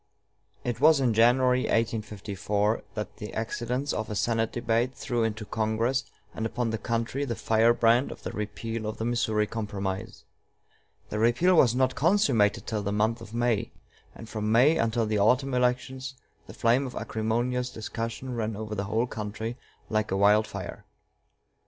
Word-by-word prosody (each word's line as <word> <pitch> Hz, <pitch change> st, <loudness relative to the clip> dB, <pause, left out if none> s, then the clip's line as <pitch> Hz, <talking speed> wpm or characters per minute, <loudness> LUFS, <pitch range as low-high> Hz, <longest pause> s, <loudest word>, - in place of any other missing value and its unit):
It 120 Hz, 0 st, -3 dB
was 155 Hz, -1 st, +6 dB
in 125 Hz, -4 st, +2 dB
January, 125 Hz, +3 st, +4 dB
1854, 105 Hz, -1 st, -1 dB
that 105 Hz, -1 st, -5 dB
the 105 Hz, -, -7 dB
accidents 125 Hz, +5 st, -2 dB
of 110 Hz, -, -3 dB
a 105 Hz, -, -3 dB
Senate 115 Hz, +2 st, 0 dB
debate 120 Hz, +2 st, 0 dB
threw 120 Hz, -3 st, -1 dB
into 110 Hz, -1 st, -2 dB
Congress 115 Hz, +6 st, 0 dB, 0.3 s
and 110 Hz, -, -4 dB
upon 115 Hz, +1 st, -1 dB
the 110 Hz, -, -2 dB
country 115 Hz, +5 st, -2 dB
the 120 Hz, -4 st, -2 dB
firebrand 115 Hz, +3 st, +3 dB
of -, -, -10 dB
the -, -, -4 dB
repeal 110 Hz, +1 st, -4 dB
of 110 Hz, -, -4 dB
the 110 Hz, -, -3 dB
Missouri 110 Hz, -3 st, +1 dB
Compromise. 100 Hz, -3 st, -4 dB, 0.9 s
The 105 Hz, -, -3 dB
repeal 120 Hz, +11 st, +4 dB
was 125 Hz, -8 st, +5 dB
not 130 Hz, 0 st, +2 dB
consummated 140 Hz, -, +2 dB
till 110 Hz, -2 st, -2 dB
the 100 Hz, 0 st, -2 dB
month 110 Hz, +3 st, +1 dB
of 115 Hz, 0 st, -9 dB
May; 120 Hz, -3 st, 0 dB, 0.4 s
and 115 Hz, -, -10 dB
from 110 Hz, 0 st, -2 dB
May 130 Hz, +8 st, +5 dB
until 115 Hz, 0 st, +1 dB
the 105 Hz, -1 st, 0 dB
autumn 130 Hz, +6 st, +3 dB
elections 130 Hz, +2 st, -1 dB, 0.3 s
the -, -, -10 dB
flame 125 Hz, +4 st, +2 dB
of 125 Hz, -, -9 dB
acrimonious 120 Hz, +3 st, -1 dB
discussion 115 Hz, +3 st, -5 dB
ran 110 Hz, -2 st, -2 dB
over 110 Hz, 0 st, -5 dB
the 100 Hz, -1 st, -2 dB
whole 110 Hz, +4 st, +1 dB
country 110 Hz, 0 st, -5 dB, 0.3 s
like 110 Hz, 0 st, 0 dB
a 95 Hz, -, 0 dB
wild 105 Hz, +2 st, +4 dB
fire. 100 Hz, -4 st, -7 dB
115 Hz, 165 wpm, -27 LUFS, 110-125 Hz, 0.9 s, was